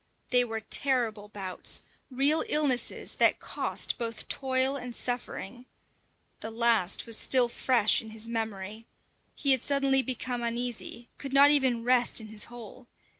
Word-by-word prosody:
They 250 -1 +5
were 225 -2 -5
terrible 225 -5 -1
bouts, 195 -3 -2 0.3
real 280 +4 +2
illnesses 285 -5 +1
that - - +4
cost - - -2
both 230 -2 -5
toil 265 0 0
and 250 -3 -6
suffering. 245 -1 -4 0.7
The 220 - -6
last 225 -5 +1
was 230 -1 +1
still 255 -2 +3
fresh 235 -2 +2
in 220 - -11
his 220 +1 -3
memory. 220 -1 -5 0.5
He 280 - +3
had 260 -3 +5
suddenly 275 -1 +3
become 255 -1 -4
uneasy, 235 0 -4
could 275 -1 -7
not 280 +1 +6
even 260 -5 +1
rest 245 0 +2
in 220 -1 -10
his 210 -1 +1
hole. 240 +1 -12
240 Hz, 145 wpm, -28 LUFS, 225-260 Hz, 0.7 s, not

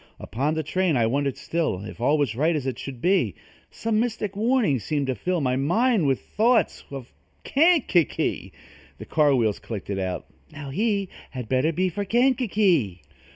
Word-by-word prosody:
Upon 140 +7 -2
the 160 - -1
train 170 0 0
I 115 - +3
wondered 140 +3 -1
still 160 - -2
If 110 - -9
all 145 +5 +3
was 140 -7 0
right 160 +6 +1
as 145 -4 -2
it 130 -3 -3
should 130 -4 -7
be. 190 +2 +2 0.3
Some 225 -1 -1
mystic 220 -4 -2
warning 220 - +2
seemed 145 +7 -2
to 130 - -1
fill 180 +5 -2
My 130 -2 +1
mind 180 - +2
with 135 -2 +1
thoughts 230 +2 +1
of 135 -3 -9 0.3
Kankakee, 285 - +2 0.5
The - - -9
car 150 -3 +3
wheels 110 -5 +1
clicked 100 -1 -6
it 95 - -2
out: 95 -1 -3 0.3
"Now, 145 -2 -8
he 200 +2 0 0.2
Had 125 -4 -7
better 130 +6 +1
be 185 +3 0
for 200 +4 -3
Kankakee!" 205 - +1
155 Hz, 175 wpm, -24 LUFS, 130-205 Hz, 0.5 s, I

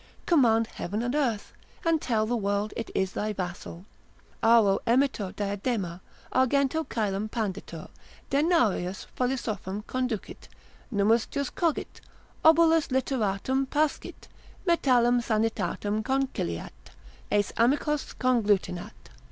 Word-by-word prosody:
command 235 -9 +4
heaven 210 +2 -4
and 245 +1 -1
earth, 250 -8 -1 0.3
and 330 -2 +2
tell 220 -3 +1
the 240 +2 -1
world 205 -1 -1
it 225 - -4
is 190 -1 +1
thy 215 +1 -2
vassal, 180 -2 -6 0.6
auro 225 -4 +5
emitur 235 -5 +2
diadema, 200 -3 -2 0.3
argento 280 +4 +2
caelum 210 -1 -1
panditur, 205 -4 -4 0.4
denarius 275 - +1
philosophum 220 -6 -2
conducit, 250 -5 -4 0.4
nummus 220 +2 +2
jus 280 -2 -3
cogit, 335 -4 -2 0.4
obolus 325 0 +5
literatum 260 0 0
pascit, 300 0 -2 0.4
metallum 245 -7 +3
sanitatem 220 -2 -1
conciliat, 260 - -2 0.6
aes 205 -1 +2
amicos 285 +5 +1
conglutinat. 210 -5 +1
230 Hz, 105 wpm, -27 LUFS, 205-265 Hz, 0.6 s, auro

